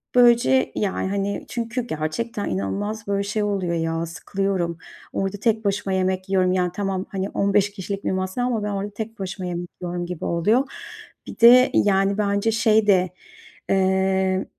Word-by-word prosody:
Böylece 245 +1 +5
yani, 195 -2 -1
hani, 200 0 -2
çünkü 235 +1 -3
gerçekten 205 +7 -3
inanılmaz 200 - -3
böyle 200 0 0
şey 210 +1 -1
oluyor 195 -4 -1
ya, 165 0 -1
sıkılıyorum, 175 0 -2 0.4
orada 195 +1 -2
tek 220 +1 0
başıma 200 -1 0
yemek 185 0 -1
yiyorum, 185 -1 +2
yani 180 -1 +1
tamam, 195 -1 -2
hani, 195 0 -3
15 200 0 +1
kişilik 200 0 -5
bir - - +1
masa 185 +4 -2
ama 240 -4 0
ben 210 - -2
orada 200 +1 -3
tek 220 +1 -6
başıma 190 -1 -4
yemek 175 0 -4
yiyorum 175 0 -3
gibi 175 -1 -5
oluyor. 210 +10 +2 0.6
Bir - - -9
de 250 +2 +8
yani 195 0 +2
bence 200 +1 +1
şey 220 -1 +3
de, 185 -2 +4 0.6
eee, 190 0 +2
195 Hz, 160 wpm, -23 LUFS, 185-210 Hz, 0.6 s, de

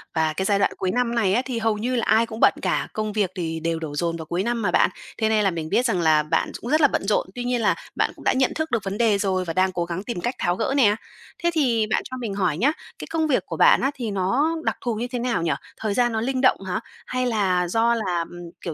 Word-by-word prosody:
Và 160 -1 +1
cái 190 +4 -2
giai 200 0 +2
đoạn - - +2
cuối 185 -1 -1
năm 245 -1 0
này 195 -5 +2
á, 245 - +3
thì 245 -3 -3
hầu 220 -1 +1
như 250 +4 -1
là 235 - 0
ai 225 +1 +4
cũng 220 0 -8
bận - - +6
cả, - - 0
công 215 -1 -3
việc 200 -4 0
thì 165 -2 -3
đều 165 0 -1
đổ 150 -3 -5
dồn 170 +1 -1
vào 160 - -7
cuối 175 +4 -2
năm 235 0 -1
mà 180 -4 0
bạn, - - +4 0.3
thế 220 -1 +1
nên 215 -1 +3
là 195 - +2
mình 160 -2 -4
biết 250 - +2
rằng 190 -7 +1
là 155 -2 +4
bạn 155 - 0
ch - - -23
cũng 240 - -6
rất 310 +1 +4
là 290 - +7
bận - - -2
rộn, 210 - +1
tuy 245 - -4
nhiên 245 -1 0
là 210 - +3 0.2
bạn - - +1
cũng - - -14
đã - - +3
nhận 260 0 +2
thức 315 -2 -2
được 230 -4 0
vấn 195 +1 -3
đề 220 -4 +3
rồi 190 -2 0
và 165 - -3
đang 185 0 +2
cố 175 -2 -2
gắng 175 +3 -4
tìm 220 -7 -4
cách 245 +1 -2
tháo 175 0 +1
gỡ 265 - -1
nè. 210 -6 +5 0.5
Thế 345 - +3
thì 235 -8 +2
bạn - - +1
cho 255 - -5
mình 225 -5 -4
hỏi 180 -6 0
nhá, 265 - +3 0.3
cái - - -7
công 320 -1 +1
việc 270 - +1
của - - -5
bạn - - +6
á, 270 - +1
thì 235 -6 -4
nó 245 - +1
đặc - - -1
thù 240 -3 -1
như 235 +3 -3
thế 245 - -2
nào 235 -7 0
nhỉ? 165 - +1 0.3
Thời 215 -2 -2
gian 240 0 +2
nó 220 0 -1
linh 260 +1 -1
động 255 - +4
hả? 185 +4 -1 0.3
Hay 255 0 -1
là 190 -7 +1
do 230 +5 +2
là, 185 -6 -1
ừm, 175 -1 -9
kiểu 170 - -4
215 Hz, 305 wpm, -23 LUFS, 180-245 Hz, 0.5 s, là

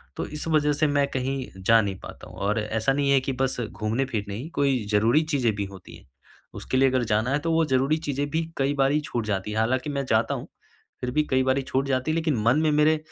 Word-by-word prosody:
तो - - -3
इस 150 +1 -6
वजह 150 -2 +2
से 150 +1 +1
मैं 145 -1 +2
कहीं 130 0 -2 0.2
जा 115 0 +6
नहीं 100 -2 -3
पाता - - -11
हूँ, - - -13
और 105 +3 0
ऐसा 110 +5 0
नहीं 140 0 +1
है 135 - +5
कि 135 - -2
बस 130 0 -1
घूमने-फिरने 110 0 -2
ही 135 +9 -6
कोई 135 -4 +1
ज़रूरी 115 +9 +4
चीज़ें 120 -6 +2
भी 100 - -2
होती 95 -2 -12
हैं। - - -20 0.5
उसके 130 - -2
लिए 135 0 +5
अगर 130 -1 +1
जाना 110 +4 +1
है 145 - +2
तो 165 - +1
वो 165 0 +3
ज़रूरी 135 +2 +2
चीज़ें 145 -2 -3
भी 160 +1 +1 0.2
कई 140 +1 +1
बारी 140 +2 +3
छूट 120 -6 -3
जाती 100 0 -2
हैं। 110 - -3
हालाँकि 130 +5 0
मैं 140 -1 -2
जाता - - +2
हूँ, - - -7 0.5
फिर 125 - -2
भी 150 +4 +2
कई 130 0 +3
बारी 130 +1 +1
छूट 135 +1 -1
जाती 130 +3 0
है, 155 - 0
लेकिन 160 -6 0
मन 120 +6 +4
में 155 -1 +2
मेरे 150 +1 +4
135 Hz, 245 wpm, -25 LUFS, 115-145 Hz, 0.5 s, जा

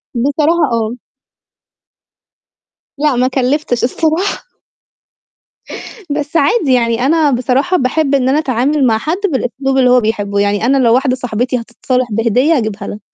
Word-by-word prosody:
بصراحة 295 +5 +1
آه. 230 0 -1 2.0
لأ، 290 -2 +1
ما 250 +1 +2
كلِّفتش 260 0 -1
الصراحة. 320 - -1 1.7
بس 295 +2 -4
عادي 290 - +2
يعني 235 0 +1
أنا 310 0 +2
بصراحة 260 +8 0
باحب 280 +1 0
إن 260 -1 +1
أنا 290 - +2
أتعامل 270 0 0
مع 220 - +2
حد 315 +10 -2
بالأسلوب 270 -4 -2
اللي 255 -1 +4
هو 250 0 +5
بيحبّه. 205 -2 -2
يعني 205 +2 0
أنا 275 +2 +2
لو 235 -3 +3
واحدة 260 0 +1
صاحبتي 250 0 -2
هتتصالح 250 +2 -2
بهدية 245 +8 +2
هاجيبها 215 -3 -4
لها. 205 - -7
255 Hz, 135 wpm, -14 LUFS, 235-290 Hz, 2.0 s, هو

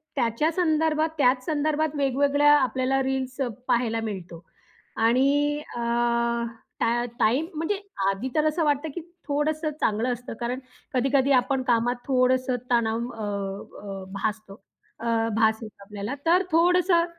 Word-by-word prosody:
त्याच्या 250 +5 +1
संदर्भात 315 -2 +1
त्याच 255 -2 +3
संदर्भात 310 0 0
वेगवेगळ्या 285 +1 +3
आपल्याला 260 0 +1
रील्स 265 0 -2
अ, 265 - +1 0.2
पाहायला 230 -2 +1
मिळतो. 175 -5 -6 0.5
आणि 275 +6 +2 0.2
अ, - - -4 1.0
टा 240 +1 +2 0.2
टाईम 255 +9 +3
म्हणजे 325 +6 -1 0.3
आधी 195 +7 -2
तर 305 - +3
असं 310 +2 0
वाटतं 295 +1 +1
की 345 - -4 0.3
थोडंसं 305 +2 0
चांगलं 230 +4 +1
असतं 245 +1 -7
कारण 245 +2 -2 0.3
कधी-कधी 270 +2 +2
आपण 265 +1 -1
कामात 245 0 +2
थोडंसं 255 -1 +2 0.2
तणाव 230 -2 +2
अ, 200 -1 -6
भासतो 210 0 -3 0.5
अ, 230 - -7 0.3
भास 220 0 +3
येतो 215 -2 -10
आपल्याला. 205 +5 -5
तर 350 +3 +4
थोडंसं 345 +1 +4
260 Hz, 130 wpm, -25 LUFS, 225-295 Hz, 1.0 s, तर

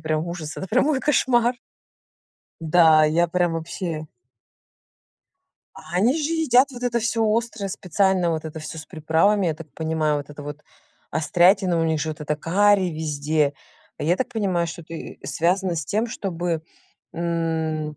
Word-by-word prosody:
прям 155 +1 -1
ужас, 165 -3 -6
это 190 - -5
прямо 255 +7 +2
мой 285 -4 +1
кошмар. 250 -4 +2 1.1
Да, 160 -1 +5
я 165 +3 +3
прям 175 0 +1
вообще. 165 -1 -4 1.7
А 180 - -7
они 225 +8 +3
же 310 -1 -1
едят 280 -5 +4
вот 245 -1 -9
это 240 -1 +1
всё 230 0 0
острое 220 -3 -3
специально, 185 -1 +1
вот 160 -1 -2
это 160 0 -7
всё 155 +1 -7
с 155 - -9
приправами, 165 +6 +2
я 160 - 0
так 155 -1 -12
понимаю, 160 -2 0
вот 145 0 -6
это 145 0 -9
вот 145 +1 -8 0.5
острятина, 175 +2 +3
у - - +1
них 160 -1 0
же 155 - -2
вот 155 - -8
это 150 0 -1
карри 195 +5 +3
везде. 150 -1 0 0.5
А - - -5
я 170 +4 +2
так 260 - -2
понимаю, 185 -6 0
что 165 +1 -7
это 165 +1 -10
и 160 - -8
связано 180 +1 0
с 160 - -2
тем, 215 - 0
чтобы, 175 -6 -3 0.5
м, 160 -2 -2
170 Hz, 165 wpm, -23 LUFS, 155-200 Hz, 1.7 s, Да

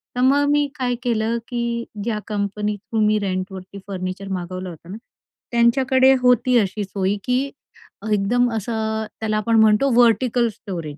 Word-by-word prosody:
तर 250 - -1
मग 280 +2 +4
मी 290 0 +2
काय 245 -1 0
केलं 230 -1 0
की 240 -1 -3 0.4
ज्या 215 -2 -2
कंपनी 210 0 -2
थ्रू 220 +2 -5
मी 215 0 +3
रेंटवरती 190 0 -5
फर्निचर 185 0 -5
मागवलं 185 +1 -6
होतं 170 +2 -12
ना, 210 - -6 0.5
त्यांच्याकडे 260 +3 +4
होती 250 0 +4
अशी 205 +1 -1
सोय 195 0 -1
की 250 0 +1 0.7
एकदम 240 +5 +2
असं, 220 0 -2
त्याला 215 -1 -1
आपण 225 +1 +2
म्हणतो 220 +5 +4
व्हर्टिकल 240 +1 +3
स्टोरेज. 165 -7 -7
220 Hz, 150 wpm, -21 LUFS, 195-245 Hz, 0.7 s, मग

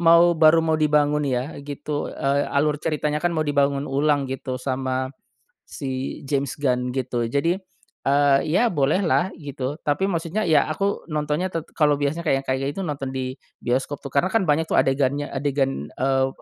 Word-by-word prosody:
mau 170 +1 +6
baru 160 +1 +6
mau 160 -1 +2
dibangun 150 -1 +2
ya 130 +1 -2
gitu, 145 +1 -4
eee, 140 +1 0
alur 150 +1 +2
ceritanya 150 -1 -1
kan 175 - +2
mau 155 -2 -1
dibangun 140 0 +1
ulang 145 0 +1
gitu 130 -1 -4
sama 130 0 -2 0.6
si 130 -1 -4
James 140 0 -1
Gun 125 -3 0
gitu. 125 -2 -2
Jadi, 165 +9 0 0.5
eee, 140 -1 +4
ya 230 +9 +3
bolehlah 165 +5 +2
gitu, 140 -1 -5
tapi 150 +7 +1
maksudnya 170 +4 -1
ya 150 -3 +5
aku 200 +4 -1
nontonnya 150 +5 -1
te 165 - -1 0.2
kalau 150 -2 +4
biasanya 155 +4 -1
kayak 135 -3 +1
kayak 135 +2 -1
itu 195 - -4
nonton 140 -6 -4
di 130 0 -4 0.2
bioskop 135 +3 -1
tuh 140 - -7
karena 175 - +1
kan 195 -8 +2
banyak 160 +2 +3
tuh - - 0
adegannya, 140 +2 0
adegan, 135 - -1
eee, 135 0 +1
145 Hz, 170 wpm, -23 LUFS, 135-155 Hz, 0.6 s, mau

